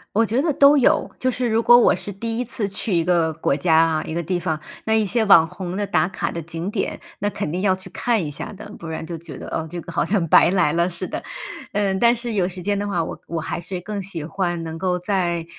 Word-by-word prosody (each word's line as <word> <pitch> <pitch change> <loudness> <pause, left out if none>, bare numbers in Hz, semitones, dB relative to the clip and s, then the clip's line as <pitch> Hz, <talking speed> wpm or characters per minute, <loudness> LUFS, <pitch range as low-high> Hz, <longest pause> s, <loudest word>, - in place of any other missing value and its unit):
我 225 +2 +4
觉 230 +5 +1
得 310 -1 +1
都 285 +2 +6
有， 265 - +3
就 255 - +1
是 250 -1 -1
如 225 +1 +2
果 240 +1 +7
我 240 - +5
是 205 - -6
第 230 +4 -3
1 250 - -1
次 230 -4 -2
去 195 0 -1
一 165 - +2
个 170 -2 +2
国 155 -3 0
家 160 +2 +2
啊， 160 -1 +3
一 160 - -5
个 170 - -2
地 175 +2 -1
方， 155 -2 -2 0.2
那 220 - +1
一 220 -1 +3
些 220 +3 +1
网 170 -5 +7
红 180 +1 -6
的 205 +1 -1
打 180 - +2
卡 185 - -3
的 170 - -4
景 165 +4 -5
点， 200 - -3 0.2
那 205 - 0
肯 150 - -4
定 175 - -2
要 190 -1 +2
去 185 0 -10
看 220 0 0
一 150 - -4
下 145 - -7
的。 205 +1 -10
不 165 - -8
然 160 0 -5
就 165 0 -6
觉 170 - -10
得， - - -8
哦， 160 0 -3
这 175 0 -6
个 170 - -9
好 170 - 0
像 195 -4 +1
白 - - +7
来 180 -5 +3
了 170 +2 +1
似 180 +1 -4
的， - - -4 0.5
嗯， 195 -2 +1
但 235 0 +5
是 235 0 -3
有 190 -4 +1
时 185 0 -6
间 200 +2 0
的 205 - -2
话， 175 -4 0
我 - - -6
我 165 -1 -3
还 160 - -4
是 180 +1 -6
更 205 +2 -4
喜 180 -5 -6
欢 175 +1 -2
能 160 0 -6
够 180 +1 0
在 175 -3 0
185 Hz, 295 characters per minute, -22 LUFS, 170-210 Hz, 0.5 s, 果